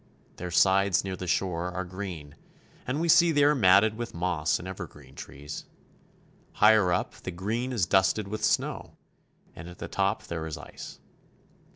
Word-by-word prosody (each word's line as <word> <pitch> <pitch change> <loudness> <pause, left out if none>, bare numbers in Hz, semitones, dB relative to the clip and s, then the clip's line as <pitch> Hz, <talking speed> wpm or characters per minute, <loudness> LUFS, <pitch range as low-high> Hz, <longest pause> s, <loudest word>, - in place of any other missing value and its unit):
Their 90 - -5
sides 95 +2 +3
near 95 -1 -4
the 90 0 -7
shore 90 0 -1
are 95 +1 -4
green, 90 -5 -7 0.5
and 130 +4 -1
we 170 - 0
see 170 +1 +6
they 145 -2 +3
are 145 +1 +5
matted 105 -3 +5
with 120 -4 -6
moss 85 -4 0
and 90 - -9
evergreen 75 -7 -9
trees. 75 +3 -9 0.9
Higher 105 -4 +5
up, 85 - -1
the - - -5
green 110 +8 -3
is 110 -8 +1
dusted 95 +3 +2
with 110 +1 -5
snow, - - -1 0.6
and 85 - -9
at 90 - -12
the - - -6
top 100 +2 -1
there 80 -1 -5
is 80 - -5
ice. - - -10
95 Hz, 170 wpm, -27 LUFS, 85-110 Hz, 0.9 s, see